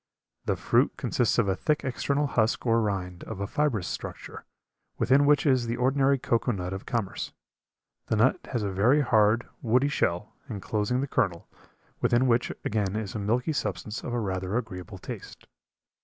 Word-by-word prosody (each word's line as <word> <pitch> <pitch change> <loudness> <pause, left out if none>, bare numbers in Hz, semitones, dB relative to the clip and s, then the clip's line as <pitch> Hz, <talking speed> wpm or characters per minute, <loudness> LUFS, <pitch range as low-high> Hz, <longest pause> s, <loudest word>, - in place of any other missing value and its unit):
The - - +1
fruit - - +2
consists - - +1
of - - +3
a 95 - +2
thick 150 +10 0
external 140 +2 0
husk 115 -4 +1
or 115 -1 +3
rind 95 -4 -3
of 110 -3 -6
a 100 - -1
fibrous 135 - 0
structure, - - -7 0.5
within 140 +3 +4
which 145 +1 +4
is 130 -4 +3
the 115 +1 -2
ordinary 135 +2 +3
cocoa 120 -1 0
nut 90 -3 -3
of 95 - -7
commerce. 115 -5 -3 0.7
The - - +1
nut 115 +5 +3
has 120 -5 -2
a 100 - -1
very 120 +10 +4
hard, 110 -2 +3
woody 125 +4 +3
shell, 90 -9 -1 0.2
inclosing 105 +3 -1
the 140 - -2
kernel, 90 -10 0 0.5
within 120 +2 +3
which 120 -1 +2
again 105 -2 0
is 110 -2 -3
a - - -3
milky 120 +9 0
substance 110 -5 -3
of - - -4
a 120 - 0
rather 95 0 -2
agreeable 95 -4 -6
taste. - - -9
115 Hz, 170 wpm, -27 LUFS, 100-130 Hz, 0.7 s, within